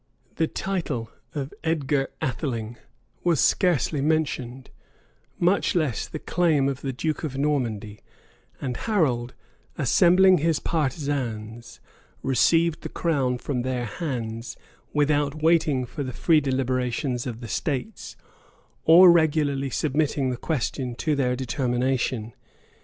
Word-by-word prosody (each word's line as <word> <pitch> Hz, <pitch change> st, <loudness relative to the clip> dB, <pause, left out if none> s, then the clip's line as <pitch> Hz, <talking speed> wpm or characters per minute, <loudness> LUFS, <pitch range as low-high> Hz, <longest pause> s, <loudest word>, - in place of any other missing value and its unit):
The 160 Hz, -, +2 dB
title 150 Hz, -15 st, -3 dB, 0.2 s
of 140 Hz, -1 st, -4 dB
Edgar 145 Hz, -4 st, 0 dB, 0.2 s
Atheling 120 Hz, -4 st, -3 dB, 0.5 s
was 170 Hz, -3 st, +2 dB
scarcely 165 Hz, -5 st, +2 dB
mentioned, 140 Hz, -4 st, -1 dB, 0.7 s
much 180 Hz, +3 st, +2 dB
less 155 Hz, -10 st, 0 dB
the -, -, -6 dB
claim 155 Hz, -4 st, +1 dB
of 135 Hz, -1 st, -3 dB
the 135 Hz, -, -2 dB
duke 155 Hz, +6 st, -3 dB
of 140 Hz, -4 st, -4 dB
Normandy; 115 Hz, -8 st, -1 dB, 0.6 s
and 125 Hz, -3 st, -3 dB
Harold, 130 Hz, -, 0 dB, 0.4 s
assembling 180 Hz, +6 st, +5 dB
his 160 Hz, 0 st, +1 dB
partisans, 130 Hz, -8 st, -3 dB, 0.4 s
received 165 Hz, +5 st, +2 dB
the -, -, -6 dB
crown 135 Hz, -7 st, 0 dB
from 125 Hz, 0 st, -3 dB
their 125 Hz, -1 st, -2 dB
hands, 115 Hz, -4 st, -5 dB, 0.3 s
without 145 Hz, 0 st, +1 dB
waiting 155 Hz, -6 st, +3 dB
for 145 Hz, +5 st, -7 dB
the 130 Hz, -2 st, -4 dB
free 160 Hz, +5 st, +3 dB
deliberation 130 Hz, 0 st, -1 dB
of 115 Hz, -2 st, -5 dB
the 120 Hz, -, -7 dB
states, 145 Hz, -, -3 dB, 0.7 s
or 175 Hz, +2 st, +9 dB
regularly 150 Hz, -4 st, +2 dB
submitting 140 Hz, -1 st, 0 dB
the -, -, -2 dB
question 130 Hz, -2 st, -2 dB
to 150 Hz, +4 st, 0 dB
their 125 Hz, -3 st, +1 dB
determination. 125 Hz, -3 st, -1 dB
140 Hz, 120 wpm, -25 LUFS, 125-160 Hz, 0.7 s, or